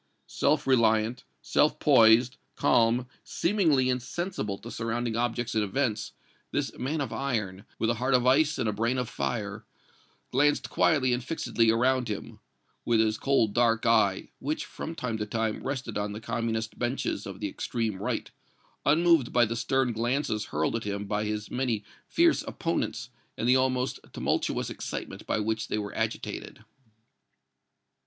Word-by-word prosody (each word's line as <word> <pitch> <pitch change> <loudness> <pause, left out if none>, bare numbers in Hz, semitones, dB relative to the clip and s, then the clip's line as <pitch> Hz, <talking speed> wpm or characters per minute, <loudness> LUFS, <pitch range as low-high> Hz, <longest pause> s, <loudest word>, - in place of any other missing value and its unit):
Self 145 +1 +1
reliant, 115 -2 +2 0.2
self - - +2
poised, 115 +2 +5 0.2
calm, 120 +2 +3 0.2
seemingly 160 - +2
insensible 125 - -2
to 115 - -10
surrounding 115 +1 -2
objects 120 0 -1
and 110 - +2
events, 110 +1 -1 0.4
this - - -2
man 145 +5 -2
of 135 - -3
iron, 105 -8 -2
with 115 - +1
a 120 0 -4
heart 130 +1 +3
of 125 -1 +2
ice 145 +4 +4
and - - 0
a 105 - 0
brain 115 +5 0
of 125 -1 -1
fire, 110 -3 -3 0.7
glanced 145 +3 +2
quietly 130 -6 +3
and 125 0 -1
fixedly 120 -5 +1
around 125 +2 +2
him, 105 -2 -6 0.4
with 115 -2 +2
his 110 -1 +2
cold, 125 -7 +2
dark 115 -1 +2
eye, 110 -4 +2
which, 150 +3 -2
from 165 - -7
time 115 -7 -3
to 105 - -2
time, 110 0 -1
rested 130 -5 -3
on 105 0 -2
the 105 - -6
Communist 115 -1 -3
benches 120 -5 -2
of 95 -1 -8
the 105 - -2
extreme 110 0 -3
right, - - -2 0.5
unmoved 165 -3 +4
by 120 -1 +4
the 115 +1 -3
stern 130 +1 +1
glances 120 -1 -1
hurled 80 +8 -1
at 115 - -2
him 100 0 -3
by 105 +1 -1
his 105 0 -3
many 125 -5 -1 0.2
fierce - - +3
opponents - - -2 0.3
and 115 - -1
the 125 - +6
almost 130 0 +1
tumultuous - - -1
excitement - - -6
by - - +1
which 110 +1 -1
they - - -1
were 105 -1 -4
agitated. - - -4
115 Hz, 160 wpm, -28 LUFS, 110-130 Hz, 0.7 s, the